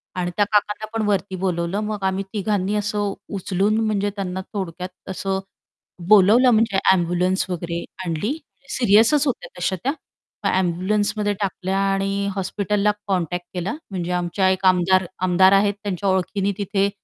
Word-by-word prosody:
आणि 175 -1 -2
त्या 205 - +4
काकांना 210 +1 +1
पण 220 - 0
वरती 195 -1 0
बोलावलं 180 +1 -1
मग 210 -2 -4
आम्ही 190 +1 -1
तिघांनी 205 -1 0
असं 205 -1 -1 0.2
उचलून 200 +2 0
म्हणजे 205 -1 0
त्यांना 190 -1 -3
थोडक्यात 180 -2 -4 0.2
असं 190 0 -2 0.7
बोलावलं 215 +5 +6
म्हणजे 220 -4 +2
ॲम्ब्युलन्स 180 +1 +1
वगैरे 170 -1 -3 0.2
आणली 170 - -1 0.4
सीरियसच 235 +6 +4
होत्या 255 - -2
तशा 185 +1 0
त्या. 275 - +2 0.5
मग - - +3
ॲम्ब्युलन्समध्ये 205 +4 0
टाकल्या 190 0 -1
आणि 195 +1 -1
हॉस्पिटलला 205 +2 0
कॉन्टॅक्ट 180 -2 -1
केला 180 +5 -2 0.2
म्हणजे 180 -2 -3
आमच्या 180 +2 +1
एक 190 +1 -1
आमदार 185 0 +4 0.2
आमदार 185 +2 +5
आहेत 200 +1 +4
त्यांच्या 200 -1 -2
ओळखीने 190 +2 0
तिथे 200 0 +1
195 Hz, 140 wpm, -22 LUFS, 180-205 Hz, 0.7 s, बोलावलं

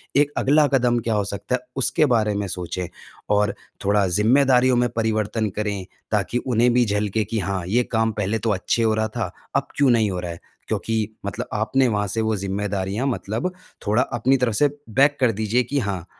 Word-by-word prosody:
एक 145 +1 +4
अगला 150 +2 +4
कदम 120 -2 +2
क्या 115 0 -1
हो 105 -1 +1
सकता 100 +5 -2
है, 125 - -4
उसके 140 +4 +2
बारे 105 -2 +1
में 100 -1 -2
सोचें। 90 0 -4 0.4
और 105 0 +2 0.3
थोड़ा 100 -1 +3
ज़िम्मेदारियों 125 +6 +4
में 120 0 +2
परिवर्तन 110 -1 0
करें 100 -2 -3 0.3
ताकि 105 +3 0
उन्हें 120 -1 +2
भी 125 -1 +4
झलके 105 +1 0
कि 110 +3 -2
हाँ, 95 -2 -2
ये 120 +6 +2
काम 110 -1 +2
पहले 105 +1 -1
तो 115 - -1
अच्छे 105 +4 0
हो 110 -1 +3
रहा 110 0 0
था, 110 - -4 0.2
अब - - +1
क्यों 140 -2 +3
नहीं 110 -3 +3
हो 90 - -3
रहा 90 -1 -4
है? 85 - -9 0.3
क्योंकि 110 -1 -2
मतलब 100 - -4
आपने 125 +5 +2
वहाँ 105 -2 0
से 110 +4 -1
वो 110 -1 0
ज़िम्मेदारियाँ 100 +4 -2
मतलब 120 - -2 0.4
थोड़ा 110 +4 +3 0.2
अपनी 130 +3 +3
तरफ 125 -3 0
से 145 - +4 0.2
बैक 140 +5 +3
कर 125 -4 +4
दीजिए 110 +3 0
कि 140 +4 -1
हाँ, 100 -7 -3
110 Hz, 200 wpm, -22 LUFS, 100-125 Hz, 0.4 s, एक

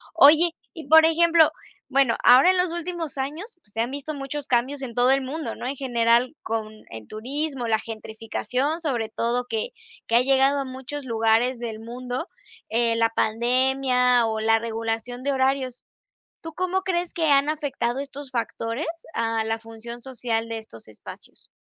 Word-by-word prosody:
Oye, 315 +4 +7 0.2
y 320 -6 -10
por 320 0 +8
ejemplo, 330 -1 +5 0.4
bueno, 270 -4 +3
ahora 260 +9 +7
en 370 - 0
los 360 -2 +1
últimos 340 -3 -4
años 315 - -5
se 210 +2 -9
han 240 +3 -2
visto 285 +2 -5
muchos 280 0 -5
cambios 260 +3 0
en 245 -3 -6
todo 245 +2 +3
el 270 0 +3
mundo, 270 -2 -4
¿no? 245 - -6
en 275 - -2
general 240 0 +2
con 220 -1 -3 0.2
el 110 -1 -9
turismo, 265 +3 -3
la 220 -1 +2
gentrificación, 230 +7 -3
sobre 245 -8 -1
todo 235 +2 -1
que 220 -2 -2 0.4
que 230 - 0
ha 240 - +7
llegado 270 +2 +3
a 275 - -2
muchos 265 +2 -7
lugares 230 +2 +2
del 225 -2 -5
mundo, 250 - -5 0.4
eh, 230 +1 +2
la 230 0 +3
pandemia 250 +2 +2
o 220 -1 -2
la 225 0 +3
regulación 225 +2 -4
de 280 - 0
horarios. 260 -1 -1 0.6
¿Tú 325 0 -8
cómo 370 +3 -1
crees 355 -2 -1
que 320 -3 +1
han 280 +1 +4
afectado 285 -5 -2
estos 280 0 -7
factores 235 +2 -3 0.3
a 225 -1 0
la 225 0 -1
función 225 +1 -9
social 235 -3 -2
de 225 0 -4
estos 165 - -14
espacios? 110 -1 -13
255 Hz, 170 wpm, -24 LUFS, 230-285 Hz, 0.6 s, por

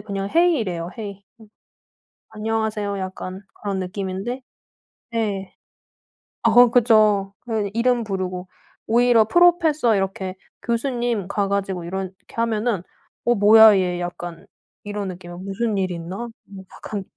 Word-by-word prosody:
그냥 200 -1 -4
"hey." 340 -1 +4
이래요. 175 -5 -3
"hey." 200 -2 -7 0.2
음. 220 - -14 0.8
"안녕하세요." 215 -2 -2
약간 185 0 -6 0.2
그런 200 -2 -2
느낌인데 195 +6 -4 0.7
네. 205 -4 -2 0.9
어 235 +1 +6
그죠. 215 -5 +4
그 215 -3 -1
이름 240 +1 +2
부르고 185 -3 -4 0.4
오히려 235 -1 +4
"프로페서." 320 -5 +4
이렇게 190 -1 -2 0.3
"교수님." 235 -4 -1
가 200 0 0
가지고 195 -3 -2
이렇게 190 +1 -4 0.2
하면은 230 -3 0 0.4
'어 240 - +3
뭐야 215 0 +8
얘.' 180 -1 -1
약간 175 -1 -6 0.4
이런 205 -1 -4
느낌이에요. 175 -1 -9
'무슨 200 +3 -2
일 190 -1 0
있나?' 180 +7 -5 0.4
약간 205 -2 -6
205 Hz, 275 characters per minute, -22 LUFS, 190-230 Hz, 0.9 s, 뭐야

